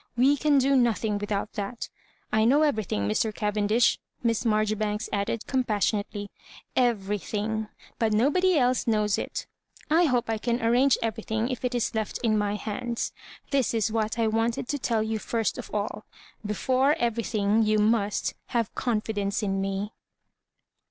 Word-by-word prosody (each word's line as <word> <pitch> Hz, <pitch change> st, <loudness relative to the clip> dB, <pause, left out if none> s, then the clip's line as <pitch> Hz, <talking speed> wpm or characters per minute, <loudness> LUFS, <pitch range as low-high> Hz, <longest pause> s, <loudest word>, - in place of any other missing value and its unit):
We 270 Hz, +4 st, +5 dB
can 290 Hz, 0 st, +3 dB
do 275 Hz, +1 st, +3 dB
no 240 Hz, -3 st, +4 dB
thing 210 Hz, -1 st, -2 dB
without 205 Hz, +1 st, -3 dB
that 210 Hz, +3 st, -4 dB, 0.5 s
I 220 Hz, 0 st, +4 dB
know 275 Hz, +7 st, +4 dB
everything, 215 Hz, -, 0 dB
Mr. 160 Hz, -, +1 dB
Cavendish," 210 Hz, +2 st, +2 dB, 0.2 s
Miss 230 Hz, -1 st, +1 dB
Marjoribanks 215 Hz, -1 st, 0 dB
added 205 Hz, +2 st, -1 dB
compas 245 Hz, -6 st, 0 dB
sionately 205 Hz, -1 st, -4 dB, 0.2 s
— -, -, -17 dB
" -, -, -46 dB
everything; 210 Hz, +1 st, -3 dB, 0.3 s
but 225 Hz, -1 st, +2 dB
nobody 300 Hz, +11 st, +3 dB
else 250 Hz, -2 st, +2 dB
knows 210 Hz, -2 st, +2 dB
it -, -, -4 dB, 0.2 s
' -, -, -25 dB
I 335 Hz, +3 st, +5 dB
hope 250 Hz, -5 st, +1 dB
I 225 Hz, -1 st, -1 dB
can 235 Hz, +2 st, 0 dB
arrange 245 Hz, +3 st, +4 dB
everything 225 Hz, +1 st, -2 dB
if 255 Hz, -1 st, -4 dB
it 250 Hz, 0 st, -1 dB
is 240 Hz, +1 st, 0 dB
left 220 Hz, -2 st, -2 dB
in 220 Hz, -2 st, +3 dB
my 205 Hz, -1 st, 0 dB
hands. 230 Hz, +3 st, -3 dB, 0.4 s
This 270 Hz, -4 st, +1 dB
is 220 Hz, -1 st, +1 dB
what 220 Hz, 0 st, -1 dB
I 230 Hz, -, +2 dB
wanted 225 Hz, +2 st, 0 dB
to 290 Hz, -, -1 dB
tell 230 Hz, -3 st, 0 dB
you 220 Hz, 0 st, -2 dB
first 225 Hz, 0 st, -1 dB
of -, -, -7 dB
all 210 Hz, +1 st, -3 dB, 0.4 s
Before 260 Hz, +7 st, +2 dB
everything, 225 Hz, -3 st, +1 dB
you 215 Hz, 0 st, +3 dB
must 210 Hz, -1 st, +1 dB, 0.2 s
havo 230 Hz, -4 st, -1 dB
confidence 215 Hz, -3 st, -1 dB
in 195 Hz, -1 st, 0 dB
me." 195 Hz, +2 st, -2 dB
220 Hz, 165 wpm, -27 LUFS, 210-240 Hz, 0.5 s, We